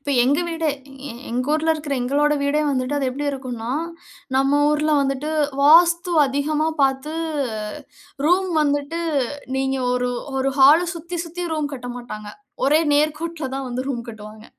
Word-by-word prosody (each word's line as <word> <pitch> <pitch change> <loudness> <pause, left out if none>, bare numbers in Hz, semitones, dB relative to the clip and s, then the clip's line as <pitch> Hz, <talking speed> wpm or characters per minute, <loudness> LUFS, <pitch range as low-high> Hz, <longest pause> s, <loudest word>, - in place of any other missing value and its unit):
இப்ப 285 - -4
எங்க 285 +6 +2
வீடே 325 -1 -1 0.4
எ - - -6 0.2
எங்க 250 +2 -1
ஊர்ல 320 +1 +2
இருக்கிற 300 -2 -3
எங்களோட 290 +4 +2
வீடே 290 +2 +1
வந்துட்டு 260 +1 -1
அது 270 -2 0
எப்படி 285 +3 -4
இருக்கும்னா, 245 -4 -5 0.7
நம்ம 275 +2 +3
ஊர்ல 300 +1 +1
வந்துட்டு 275 +2 -2 0.3
வாஸ்து 340 +4 +5
அதிகமா 295 +3 0 0.2
பாத்து, 270 +2 0 1.1
ரூம் 370 +3 +3
வந்துட்டு 290 +3 -1 0.6
நீங்க 270 0 0
ஒரு 250 0 0 0.3
ஒரு 265 +1 +1
ஹால 285 +5 +8
சுத்தி 340 +1 -6
சுத்தி 350 +2 -5
ரூம் 300 -2 -2
கட்ட 245 -1 -7
மாட்டாங்க. 215 -4 -8 0.4
ஒரே 300 +4 +4
நேர்கோட்டில் 305 -1 -1
தான் 270 0 -4
வந்து 245 +1 -3
ரூம் 240 -4 -3
கட்டுவாங்க. 215 -1 -10
285 Hz, 150 wpm, -22 LUFS, 260-310 Hz, 1.1 s, ஹால